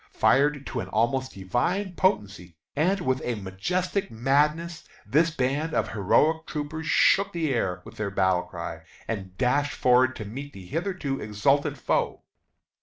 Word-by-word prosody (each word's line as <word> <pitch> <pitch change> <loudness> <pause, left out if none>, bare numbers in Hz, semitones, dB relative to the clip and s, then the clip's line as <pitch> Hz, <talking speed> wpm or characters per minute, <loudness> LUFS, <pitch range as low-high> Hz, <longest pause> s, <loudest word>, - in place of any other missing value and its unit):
Fired 140 +1 +3
to 125 - -4
an - - -4
almost 130 +4 0
divine 170 - -1
potency, 100 - 0 0.2
and 180 +7 +2
with 130 -5 0
a 120 - -1
majestic 180 - -2
madness, 150 +8 +1 0.2
this 165 +4 +3
band 150 +2 -1
of - - +1
heroic 155 - +2
troopers 155 +1 -4
shook 200 +5 +4
the 160 -5 0
air 95 -7 -1
with 110 0 -12
their 105 -2 -2
battle 95 -2 +2
cry, - - -7 0.3
and 95 -4 -5
dashed 145 +3 +1
forward 130 +1 +4
to 105 - -6
meet 140 +7 -7
the 95 -2 -10
hitherto 165 - -3
exultant 110 +8 +1
foe. - - -1
135 Hz, 150 wpm, -26 LUFS, 110-160 Hz, 0.3 s, shook